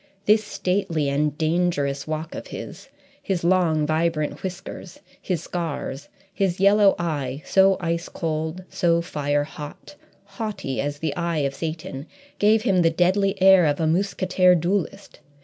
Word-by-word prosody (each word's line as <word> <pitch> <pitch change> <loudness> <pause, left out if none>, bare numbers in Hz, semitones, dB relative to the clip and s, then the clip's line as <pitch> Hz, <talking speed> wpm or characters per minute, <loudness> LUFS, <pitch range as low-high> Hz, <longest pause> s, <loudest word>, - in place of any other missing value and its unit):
This 215 +1 +4
stately 180 -7 -1
and 150 +1 0
dangerous 155 -4 0
walk 155 +1 -4
of - - -7
his, - - -9 0.3
his 185 -4 -2
long, 170 -4 +2
vibrant 155 -1 -1
whiskers, 185 -1 -7 0.2
his 175 -4 -2
scars, 150 -4 -4 0.2
his 190 -2 0
yellow 200 0 +5
eye, 145 -5 -3
so 195 0 +4
ice 170 0 -2
cold, 160 +1 -3
so 170 -2 +1
fire 145 -2 -1
hot, 150 +5 -10 0.3
haughty 200 - -4
as 145 +1 -3
the 145 -1 -3
eye 170 -4 -1
of 140 - -2
Satan, 155 -2 -5 0.3
gave 215 +1 +4
him 195 -6 +3
the 165 - +4
deadly 185 +4 +1
air 190 -3 +7
of 145 -1 0
a 160 - +1
mousquetaire 185 +1 +2
duellist. 190 +3 -2
170 Hz, 145 wpm, -23 LUFS, 155-190 Hz, 0.3 s, air